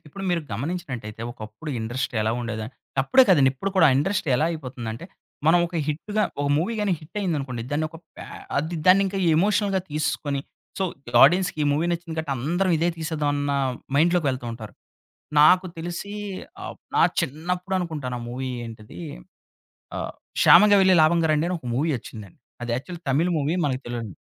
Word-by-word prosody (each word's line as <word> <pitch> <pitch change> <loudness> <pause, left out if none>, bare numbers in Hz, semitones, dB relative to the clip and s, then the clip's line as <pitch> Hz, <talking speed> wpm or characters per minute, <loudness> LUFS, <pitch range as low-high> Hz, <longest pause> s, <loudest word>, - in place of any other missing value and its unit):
ఇప్పుడు 195 +6 -9
మీరు 170 -1 +1
గమనించినట్టయితే, 125 - -5
ఒకప్పుడు 110 +7 -8
ఇండస్ట్రీ 120 +1 -3
ఎలా 110 +1 +1
ఉండేదని 110 0 -4 0.3
అప్పుడే 260 - +6
కాదండి, 140 -8 +5
ఇప్పుడు 195 +9 -3
కూడా 165 -4 +7
ఇండస్ట్రీ 175 0 0
ఎలా 155 - +2
అయిపోతుందంటే, 130 -5 -6 0.4
మనం 175 +2 +6
ఒక 170 - -6
హిట్‌గా 205 +8 -1 0.2
ఒక 145 - 0
మూవీ 185 +9 0
గాని 200 -3 +1
హిట్టయిందనుకోండి, 150 - -3
దాన్ని 155 +2 0
ఒక 165 - -10 0.2
పే - - -8 0.3
అది 160 +4 -1
దాన్ని 190 +2 +7
ఇంక 195 +1 -4 0.2
ఎమోషనల్‌గా 200 +1 +2
తీసుకొని 145 -2 -1 0.4
సో, - - 0 0.3
ఈ - - -6
ఆడియన్స్‌కి 180 +3 +4
ఈ - - +2
మూవీ 160 +4 +1
నచ్చింది 170 -1 -4
కాబట్టి 155 -3 -2
అందరం 175 +9 0
ఇదే 170 - +2
తీసేద్దాం 155 -2 -2
అన్న 145 0 -1 0.4
మైండ్‌లోకి 170 +1 +3
వెళ్తూ 125 -2 -5
ఉంటారు. 110 -2 -9 0.7
నాకు 180 +5 +6
తెలిసి 175 +4 -5 0.5
ఆహ్, - - -6 0.2
నా - - +4 0.2
చిన్నప్పుడు 180 +6 -3
అనుకుంటాను 150 -8 -4
ఆ - - -8
మూవీ 130 +2 -4 0.2
ఏంటిది? 110 -6 -10 1.0
ఆహ్, - - -4 0.3
'క్షామంగా 205 +3 +7
వెళ్ళి 190 -1 +5
లాభం 170 +2 +4
గారండి' 155 +1 +2
అని 180 - -1
ఒక 125 - -11
మూవీ 155 +5 +1
ఒచ్చిందండి. 105 -4 -11 0.2
అది 120 - -3
యాక్చువల్లీ 165 +7 -6
తమిళ్ 160 +7 +2
మూవీ 150 +3 0
మనకు 130 -2 -1
తెలోన్ 120 -2 -4
155 Hz, 165 wpm, -24 LUFS, 130-180 Hz, 1.0 s, కూడా